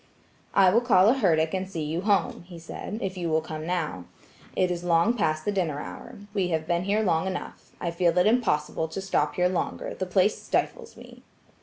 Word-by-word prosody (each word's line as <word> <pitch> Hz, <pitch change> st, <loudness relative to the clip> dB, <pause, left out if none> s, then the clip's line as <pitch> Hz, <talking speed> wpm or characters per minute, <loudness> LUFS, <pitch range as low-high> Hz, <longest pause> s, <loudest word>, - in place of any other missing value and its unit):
"I 190 Hz, -2 st, +6 dB
will 230 Hz, +5 st, +4 dB
call 210 Hz, -5 st, +5 dB
a -, -, +6 dB
herdic 165 Hz, -11 st, +2 dB
and 190 Hz, 0 st, -2 dB
see 165 Hz, -5 st, -4 dB
you 160 Hz, +3 st, -2 dB
home," 200 Hz, -1 st, +1 dB
he 175 Hz, -2 st, -10 dB
said, 165 Hz, +5 st, -7 dB
"if 190 Hz, -1 st, -3 dB
you 175 Hz, -2 st, -2 dB
will 160 Hz, 0 st, +3 dB
come 155 Hz, 0 st, -6 dB
now. 155 Hz, -, -2 dB, 0.5 s
It 185 Hz, -1 st, +2 dB
is 175 Hz, 0 st, -3 dB
long 170 Hz, +6 st, +3 dB
past 155 Hz, -8 st, 0 dB
the 205 Hz, -, +1 dB
dinner 170 Hz, -7 st, -1 dB
hour. -, -, -8 dB, 0.2 s
We 195 Hz, -4 st, +1 dB
have 160 Hz, -2 st, -1 dB
been 175 Hz, +2 st, 0 dB
here 210 Hz, +2 st, +1 dB
long 170 Hz, -2 st, +1 dB
enough. 190 Hz, -1 st, -6 dB
I 170 Hz, -, -2 dB
feel 170 Hz, 0 st, +1 dB
it 180 Hz, -, +5 dB
impossible 160 Hz, -9 st, +1 dB
to 160 Hz, +4 st, -6 dB
stop 190 Hz, -6 st, 0 dB
here 180 Hz, 0 st, +3 dB
longer, 180 Hz, -1 st, -3 dB
the 185 Hz, -, -4 dB
place 190 Hz, +3 st, +2 dB
stifles 470 Hz, -2 st, -2 dB
me." -, -, -13 dB
180 Hz, 210 wpm, -26 LUFS, 160-195 Hz, 0.5 s, I